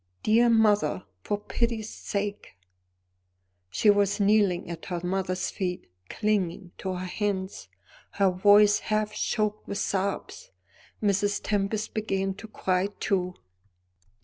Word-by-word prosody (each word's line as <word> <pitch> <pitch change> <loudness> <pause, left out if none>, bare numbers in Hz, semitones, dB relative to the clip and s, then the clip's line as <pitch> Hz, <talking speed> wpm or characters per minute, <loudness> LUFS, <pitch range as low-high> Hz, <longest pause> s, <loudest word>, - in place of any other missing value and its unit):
Dear 235 +3 +4
mother, 210 -8 +3 0.2
for 205 - -1
pity's 225 0 -2
sake 200 - -4 0.5
" 90 - -48 0.5
She 205 - +4
was 205 0 +2
kneeling 200 -3 +3
at 165 -1 -7
her 175 -2 -3
mother's 185 0 -1
feet, 180 - -4 0.2
clinging 195 -4 -1
to 190 -1 -3
her 180 +1 -4
hands, 190 0 -3 0.5
her 195 -2 +3
voice 205 +2 +5
half 215 0 -1
choked 215 -1 -1
with 200 - -3
sobs. 200 - -2 0.5
Mrs. 205 0 +2
Tempest 205 +1 -1
began 195 -3 -1
to 215 +3 -10
cry 185 -3 0
too. 180 -2 0
200 Hz, 120 wpm, -27 LUFS, 185-215 Hz, 0.5 s, voice